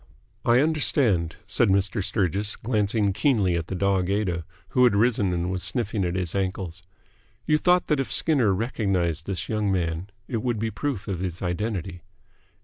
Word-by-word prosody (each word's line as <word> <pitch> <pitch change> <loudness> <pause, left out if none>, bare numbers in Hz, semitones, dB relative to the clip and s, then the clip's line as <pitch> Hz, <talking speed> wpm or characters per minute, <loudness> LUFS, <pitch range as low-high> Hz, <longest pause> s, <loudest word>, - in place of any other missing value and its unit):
"I 120 +2 +4
understand," 130 - +2
said - - +2
Mr. 100 0 +1
Sturgis, 100 0 0
glancing 105 -3 0
keenly 100 - +2
at 85 -1 -2
the 95 - -4
dog 95 -1 +1
Aida, 95 -5 -1 0.2
who 125 - +3
had 120 -5 +5
risen 105 -3 +2
and 90 +1 -1
was 95 -1 -2
sniffing 110 -4 -2
at 90 0 -2
his 90 -3 -2
ankles. 95 -2 -3 0.6
"You 150 0 +3
thought 180 +1 +3
that 150 -3 +1
if 135 - -2
Skinner 135 -10 +2
recognised 95 - -1
this 95 -2 -3
young 105 -2 0
man, 85 0 -1 0.2
it 120 - -2
would 120 +1 -1
be 110 +1 -2
proof 120 -2 -3
of 95 -4 -3
his 90 0 -4
identity?" 90 -1 -3
100 Hz, 170 wpm, -25 LUFS, 90-115 Hz, 0.6 s, had